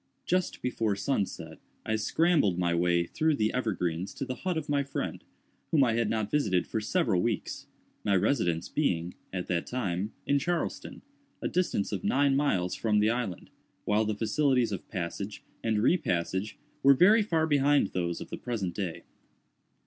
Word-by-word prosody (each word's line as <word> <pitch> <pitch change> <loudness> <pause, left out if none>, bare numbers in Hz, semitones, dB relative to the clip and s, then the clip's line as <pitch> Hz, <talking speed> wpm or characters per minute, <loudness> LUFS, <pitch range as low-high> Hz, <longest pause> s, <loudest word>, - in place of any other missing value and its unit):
Just 185 0 -1
before 115 -4 0
sunset 100 -1 -2 0.3
I 110 - 0
scrambled 140 - +2
my 85 -1 +1
way 85 0 +2
through 155 - +1
the 110 -4 0
evergreens 95 -7 -2
to - - -3
the 130 - -3
hut 180 +5 -2
of 155 -1 -3
my 145 -1 +2
friend, 140 0 -4 0.5
whom 150 -4 +4
I 120 -3 +2
had 115 -2 +1
not 110 -2 -1
visited 95 -12 +2
for 110 - -3
several 110 - +1
weeks—my 100 +2 -3
residence 90 -6 +1
being, 90 - -1 0.2
at 90 -1 -3
that 85 -2 -1
time, 100 -4 -2
in 140 0 +2
Charleston, 170 +3 -3 0.4
a - - -2
distance 180 - 0
of 100 -4 -3
nine 140 0 +3
miles 95 -11 +1
from 110 -2 +1
the 105 +1 +4
island, 115 -7 -4 0.3
while 105 +1 +2
the 110 -1 -1
facilities 120 +2 +2
of 95 - -5
passage 100 +2 -5 0.2
and 110 -2 +1
re 175 - +4
passage 95 - -2 0.2
were 140 0 +7
very 205 - +6
far 165 -6 +1
behind 145 -5 +3
those 85 -2 -2
of - - -9
the - - -4
present 105 -8 -3
day. 90 -4 -4
110 Hz, 170 wpm, -29 LUFS, 95-140 Hz, 0.5 s, were